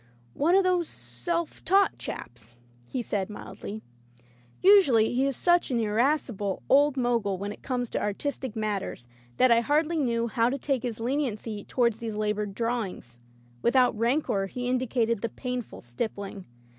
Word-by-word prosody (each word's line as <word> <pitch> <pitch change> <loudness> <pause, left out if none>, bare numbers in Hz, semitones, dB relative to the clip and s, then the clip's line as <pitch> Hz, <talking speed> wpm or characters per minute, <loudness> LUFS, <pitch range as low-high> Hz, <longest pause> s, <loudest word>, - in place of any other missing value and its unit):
"One 335 +5 +3
of 390 - +5
those 360 -3 +2
self 340 -2 -4
taught 390 +3 +3
chaps," 120 0 -8 0.3
he 255 - -2
said 200 -3 -2
mildly. 210 0 -8 0.8
Usually 285 - +6
he 265 +3 +2
is 275 - -2
such 350 -2 +3
an 245 -3 +1
irascible 220 -3 0
old 285 +1 +5
Mogul 235 -6 +1
when 200 +2 -4
it - - -10
comes 250 -2 -2
to - - -1
artistic 245 +3 -3
matters 205 - -3 0.3
that 255 -1 +5
I 230 - +6
hardly 310 +5 +1
knew 235 -4 +1
how 230 +1 +2
to 275 - -2
take 275 -2 -1
his 230 -2 -4
leniency 230 -5 -2
tow 250 - 0
ard 235 -1 +4
these 225 0 -6
labored 210 -1 -2
drawings. 215 - -3 0.4
Without 250 -1 +4
rancor 230 -3 +1
he 245 +5 -4
indicated 240 -3 0
the 230 - -1
painful 250 0 -5
stippling. 195 - -5
235 Hz, 155 wpm, -27 LUFS, 210-275 Hz, 0.8 s, Usually